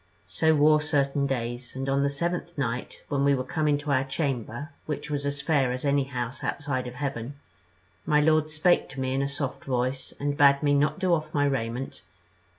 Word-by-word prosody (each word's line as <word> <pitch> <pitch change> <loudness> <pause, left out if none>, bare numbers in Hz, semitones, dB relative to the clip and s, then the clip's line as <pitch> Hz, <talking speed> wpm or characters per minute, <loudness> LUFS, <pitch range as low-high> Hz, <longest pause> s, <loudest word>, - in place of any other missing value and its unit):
"So 155 - +2
wore 150 +1 +5
certain 140 -2 +1
days; 120 -1 -3
and 135 +1 -3
on 135 +1 +2
the 140 - +2
seventh 170 +3 -3
night, 125 -3 -3
when 140 -1 0
we 140 0 +4
were 130 - -2
come 155 +4 -1
into 145 0 +1
our 130 -1 +3
chamber, 135 -1 -3 0.2
which 150 0 -4
was 145 -1 -1
a - - +1
fair 140 -2 +1
as 125 +3 -4
any 140 -1 +2
house 125 -2 -5
outside 130 -3 -2
of 125 - -8
heaven, 135 -1 -4 0.7
my 150 - +3
lord 155 0 +3
spake 155 +3 +2
to 135 - -8
me 130 0 -1
in 135 - +1
a 140 - -1
soft 140 -1 -4
voice, 130 0 -1
and 145 0 -1
bade 140 -1 +5
me 145 -1 +3
not 145 +1 +2
do 185 -2 +2
off 155 -2 -1
my 145 0 +3
raiment. 125 -1 -2
140 Hz, 205 wpm, -27 LUFS, 130-150 Hz, 0.7 s, wore